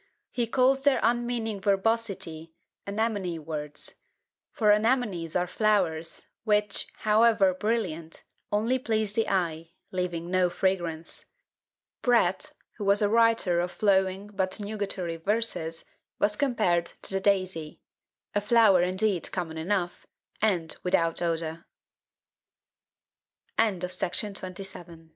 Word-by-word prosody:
He 240 -2 -1
calls 265 +3 +3
their 275 -3 +3
unmeaning 235 -3 0
verbosity 195 -6 -1 0.3
"anemone 200 -4 -1
words;" 150 -2 -6 0.5
for 210 -2 +3
anemonies 210 -7 +1
are 180 - +2
flowers, 180 -5 0 0.2
which, 210 -2 +1
however 215 -2 +4
brilliant, 185 -6 -2 0.3
only 230 +5 +1
please 220 -4 -1
the 225 +1 +1
eye, 165 -3 -1 0.2
leaving 180 -2 -3
no 185 -1 +3
fragrance. 175 -3 -2 0.8
Pratt, 245 -2 +2 0.3
who 210 - -5
was 200 +1 +3
a 205 - +3
writer 230 -6 +3
of 175 +1 -1
flowing 190 -1 +1
but 190 +1 -1
nugatory 200 -5 -3
verses, 175 -4 -1 0.3
was 210 0 +2
compared 210 -10 +1 0.2
to - - +2
the 195 - +1
daisy; 185 -6 0 0.5
a 205 - +1
flower 205 -4 +5
indeed 185 +1 0
common 165 -3 -4
enough, 175 +1 -2 0.3
and 180 -7 +1
without 170 -3 +1
o 165 -1 -1
195 Hz, 105 wpm, -27 LUFS, 170-220 Hz, 0.8 s, flower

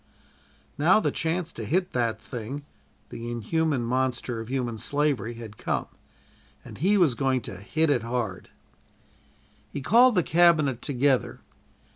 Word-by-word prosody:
Now 175 +8 +5
the - - 0
"chance 165 +1 -2
to - - -7
hit 180 +3 0
that 115 -3 0
thing" 125 +5 -7 0.4
the 115 +1 -6
inhuman 140 +3 0
monster 125 -1 -1
of 115 - -6
human 125 -4 -2
slavery 140 -5 0
had 110 -2 -10
come, - - -1 0.8
and - - -11
he 195 +7 +3
was 170 -9 +4
going 130 0 0
to 95 - -8
"hit 155 - 0
it 125 -5 +2
hard." 115 0 -3 1.2
He - - -4
called 235 - +5
the 180 - +3
Cabinet 155 -7 +3
together. 135 -1 0
135 Hz, 140 wpm, -26 LUFS, 120-160 Hz, 1.2 s, Now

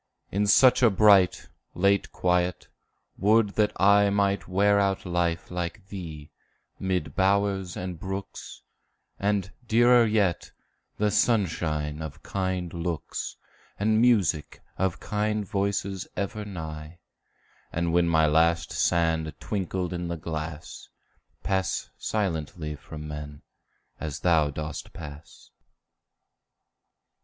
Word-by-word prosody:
In 100 +2 +1
such 130 +5 +6
a 120 - +7
bright, 100 -2 +4 0.3
late 100 +2 +2
quiet, 90 0 0 0.5
would 105 +2 +4
that 105 +1 +1
I 100 +1 +5
Might 100 0 +1
wear 100 +2 +3
out 95 -1 0
life 85 -1 -1
like 90 +3 -5
thee, 80 -7 -8 0.5
mid 95 -1 -2
bowers 95 -1 +1
and 90 -2 -5
brooks, 95 +2 -7 0.6
And, 100 -1 0 0.2
dearer 120 +1 +5
yet, 105 -5 +1 0.5
the 105 0 +1
sunshine 80 -10 0
of 80 -3 -8
kind 95 -3 -2
looks, 85 -2 -4 0.4
And 110 +2 +2
music 100 -11 +2
of 95 -2 -1
kind 105 -1 -1
voices 100 -2 -2
ever 100 +2 -3
nigh; 80 -4 -7 0.7
And 85 0 -1
when 85 -1 +3
my 80 -1 +4
last 80 +2 +2
sand 80 -2 +1
twinkled 95 -3 -3
in 90 0 -3
the 85 0 -3
glass, 80 -1 -6 0.5
Pass 95 -2 -1
silently 80 -6 -2
from 75 +2 -9
men, 75 -1 -8 0.6
as 75 -2 -5
thou 80 -4 +3
dost 75 +1 -6
pass. 75 0 -11
90 Hz, 110 wpm, -26 LUFS, 80-100 Hz, 0.7 s, a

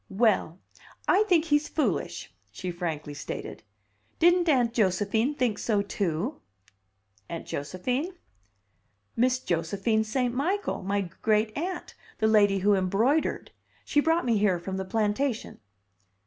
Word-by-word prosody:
"Well, 195 -5 +2 0.5
I 410 +3 +4
think 335 -3 +4
he's 295 -1 +2
foolish!" 310 - -2 0.2
she 185 -1 -5
frankly 160 -4 -4
stated. - - -6 0.6
"Didn't 350 0 +4
Aunt 245 -5 +3
Josephine 215 +6 +1
think 245 -6 0
so, 210 -3 +1
too?" 200 - -2 0.9
"Aunt 170 -1 -5
Josephine?" 250 - -3 1.0
"Miss 250 +2 +3
Josephine 195 +3 0
St. 245 +2 -1
Michael 365 +11 -1
my 200 +2 0 0.2
greet 215 0 +2
aunt 350 +4 -4 0.2
the 220 - 0
lady 205 -2 +4
who 205 - +6
embroidered. 205 - +1 0.3
She 295 - +2
brought 325 +2 +2
me 230 -4 +2
here 200 -3 +3
from 190 +2 -5
the 190 - -3
plantation." 220 +5 -1
220 Hz, 125 wpm, -27 LUFS, 190-280 Hz, 1.0 s, who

